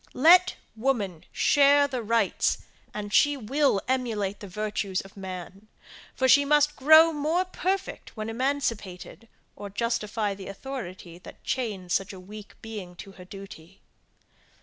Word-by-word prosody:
Let 355 +7 +6 0.2
woman 220 -9 -2
share 285 0 +4
the 260 -3 -4
rights, 230 +1 +1 0.3
and 205 0 -6
she 290 +4 +4
will 270 -1 +1
emulate 225 -6 -1
the 205 - -9
virtues 205 -1 -2
of 195 - -16
man; 190 +1 -8 0.5
for 260 - +1
she 285 +2 +6
must 295 +1 +3
grow 315 +4 +7
more 315 +5 0
perfect 375 -5 -4
when 215 0 -4
emancipated, 230 -5 -3 0.3
or 205 - -8
justify 215 -1 -1
the 195 -1 -10
authority 190 -6 -8
that - - -14
chains 205 -8 -3
such 195 0 -1
a 190 - -10
weak 205 +3 -11
being 205 -6 -8
to 195 +2 -10
her 185 -1 -13
duty. 195 -2 -12
215 Hz, 140 wpm, -26 LUFS, 195-275 Hz, 0.5 s, grow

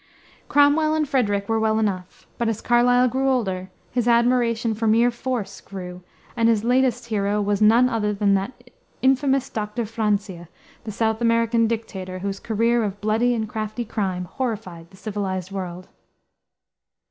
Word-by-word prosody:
Cromwell 295 +2 +4
and 310 -1 0
Frederick 205 -7 0
were 225 0 +1
well 220 0 +1
enough; 190 -4 -3
but 235 -1 +1
as 220 -1 -2
Carlyle 245 +1 +3
grew 265 +2 0
older, 190 -8 -1 0.2
his 245 -1 -1
admiration 235 -1 +2
for 220 +1 -2
mere 230 +3 +4
force 240 -3 -4
grew, 180 -2 -8 0.3
and 230 -1 +3
his 220 -2 +2
latest 245 -1 +1
hero 205 -1 0
was 205 0 0
none 230 +4 +6
other 220 -4 0
than 200 -1 +1
that 245 +5 -3 0.3
infamous 270 0 +2
Dr. 215 +2 -3
Francia, 205 -5 -2 0.4
the 215 - -4
South 220 +2 -1
American 230 0 +2
dictator, 195 -5 -4
whose 195 +1 -4
career 230 +2 +1
of 200 -1 -4
bloody 225 +4 +1
and 220 -1 -2
crafty 215 +2 -4
crime 190 -5 -2
horrified 185 -6 -5
the 190 - -18
civilized 195 -3 -4
world. 185 -2 -6
220 Hz, 155 wpm, -23 LUFS, 200-240 Hz, 0.4 s, none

